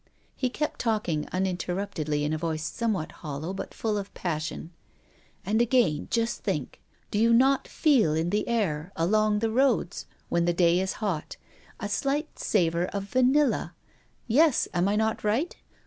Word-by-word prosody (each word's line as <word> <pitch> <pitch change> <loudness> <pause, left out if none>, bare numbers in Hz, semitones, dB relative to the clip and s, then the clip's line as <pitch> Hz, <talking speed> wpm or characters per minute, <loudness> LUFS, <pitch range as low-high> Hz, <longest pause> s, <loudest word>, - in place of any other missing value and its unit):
He 255 - 0
kept 300 +4 -3
talking 210 -10 -1
uninterruptedly 180 -4 -2
in 150 +1 0
a - - 0
voice 160 -1 -2
somewhat 215 -3 -2
hollow 155 +3 -6
but 195 - -6
full 215 -2 -1
of 200 0 -7
passion. 160 -1 -4 0.7
"And 215 +4 +2
again, 235 - +2
just 230 0 0
think, - - -3 0.3
do 210 - 0
you 230 +1 +4
not 265 +4 +4
feel 250 - +3
in 165 +2 0
the 210 - 0
air, 190 -8 -1
along 210 +5 +2
the 225 +1 0
roads, 245 -7 +1 0.2
when 170 0 +1
the 175 - +2
day 170 0 +3
is 190 0 -1
hot, 170 -7 -3 0.4
a 205 - -3
slight 275 +9 -2
savor 170 -3 +1
of 200 -1 -4
vanilla. 255 +7 +2 0.5
Yes, 285 +4 +3
am 175 +1 +2
I 205 - +1
not 220 +1 0
right? 230 +11 0
205 Hz, 160 wpm, -27 LUFS, 170-230 Hz, 0.7 s, you